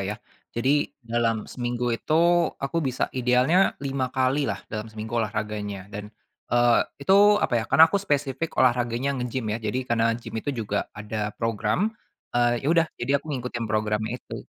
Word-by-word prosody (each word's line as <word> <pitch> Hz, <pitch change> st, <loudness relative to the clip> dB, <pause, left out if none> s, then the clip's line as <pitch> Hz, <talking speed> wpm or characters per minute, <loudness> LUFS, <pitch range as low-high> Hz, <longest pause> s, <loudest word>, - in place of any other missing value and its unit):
ya. 100 Hz, +3 st, -3 dB, 0.4 s
Jadi, 135 Hz, +5 st, +2 dB
dalam 115 Hz, -2 st, 0 dB
seminggu 120 Hz, -1 st, -2 dB
itu, 155 Hz, -, -5 dB, 0.4 s
aku 135 Hz, +5 st, -2 dB
bisa 130 Hz, -3 st, -1 dB
idealnya 130 Hz, +9 st, +3 dB
5 135 Hz, -2 st, -1 dB
kali 130 Hz, +2 st, +1 dB
lah, -, -, -4 dB
dalam 110 Hz, 0 st, -4 dB
seminggu, 110 Hz, +1 st, -7 dB
olahraganya, 105 Hz, -2 st, -4 dB
dan, 105 Hz, +1 st, -6 dB, 0.4 s
eee, 120 Hz, -1 st, +5 dB, 0.3 s
itu, 190 Hz, -, +3 dB, 0.3 s
apa -, -, -2 dB
ya, -, -, -4 dB
karena 160 Hz, -, +8 dB
aku -, -, +1 dB
spesifik 145 Hz, -2 st, -2 dB
olahraganya, 120 Hz, +1 st, +2 dB
nge-gym, 125 Hz, -1 st, -3 dB
ya. 110 Hz, -, -2 dB
Jadi, 115 Hz, +3 st, -2 dB
karena 115 Hz, -1 st, +2 dB, 0.2 s
gym 115 Hz, -2 st, -9 dB
itu 145 Hz, -, -2 dB
juga 105 Hz, -2 st, -2 dB
ada 105 Hz, +1 st, -6 dB, 0.2 s
program, 115 Hz, -, 0 dB, 0.4 s
eee, 120 Hz, 0 st, +2 dB
ya -, -, -1 dB
udah, 165 Hz, -1 st, +4 dB
jadi, 120 Hz, -, -2 dB
aku 155 Hz, -, -18 dB
ngikutin 125 Hz, -3 st, -3 dB
programnya 110 Hz, 0 st, 0 dB
itu. -, -, -8 dB
120 Hz, 165 wpm, -25 LUFS, 110-135 Hz, 0.4 s, karena